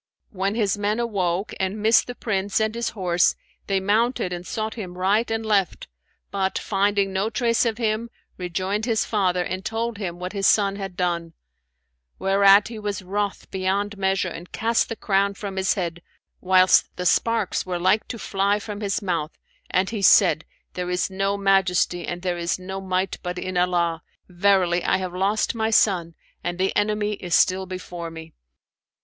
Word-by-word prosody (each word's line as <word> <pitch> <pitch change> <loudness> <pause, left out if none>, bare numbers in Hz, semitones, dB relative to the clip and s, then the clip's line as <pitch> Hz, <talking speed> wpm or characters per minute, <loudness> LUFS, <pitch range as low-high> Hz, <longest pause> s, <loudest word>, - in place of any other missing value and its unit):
When 195 +1 -1
his 205 -3 0
men 210 +2 0
awoke 195 -5 -1
and 190 +2 -1
missed 220 +2 +4
the 245 - -6
Prince 200 -3 -1
and 220 0 0
his 235 0 -2
horse, 175 -2 +2 0.3
they 195 -1 +1
mounted 210 0 +1
and 175 0 -6
sought 220 0 -3
him 185 -6 -7
right 200 +5 +2
and 225 0 -2
left 200 -5 0 0.4
but, 190 -1 -1
finding 200 -1 0
no 195 +3 0
trace 230 +1 +1
of 225 -2 -2
him, 225 0 -1 0.3
rejoined 190 +4 -2
his 225 -3 +1
father 185 -4 +1
and 185 +2 -4
told 225 0 -3
him 175 -4 -4
what 180 +2 -5
his 195 -1 +1
son 200 -2 +3
had 195 -3 -6
done; 170 -2 -1 0.8
whereat 195 +2 +5
he 225 -2 -7
was 205 -2 -4
wroth 200 +2 -3
beyond 195 +2 -1
measure 190 -1 0
and 175 0 -8
cast 230 +1 +1
the 230 - -3
crown 200 -1 +1
from 195 -1 -6
his 190 -1 +1
head, 170 -3 -3 0.4
whilst 185 0 +4
the 180 - -4
sparks 230 +1 +1
were 180 -1 -3
like 190 +5 +2
to 240 - -5
fly 200 -1 0
from 210 0 -7
his 200 -1 -1
mouth, 170 -5 -2 0.3
and 185 +2 +1
he 215 -3 -3
said 185 -4 +5 0.3
'There 180 0 -4
is 180 +2 -1
no 195 +1 0
Majesty 185 -3 +2
and 175 0 -5
there 175 -2 -1
is 170 0 -1
no 190 +1 -6
Might 185 0 -1
but 180 0 -4
in 185 0 -4
Allah! 175 -2 +1 0.3
Verily 180 -1 +2
I - - +2
have 185 -2 -4
lost 200 +6 0
my 220 -1 0
son, 180 -6 +2 0.3
and 175 0 -3
the 190 +1 0
enemy 210 0 +1
is 180 -4 -1
still 190 0 +3
before 180 -2 -6
me.' 160 0 -10
195 Hz, 180 wpm, -23 LUFS, 180-210 Hz, 0.8 s, whereat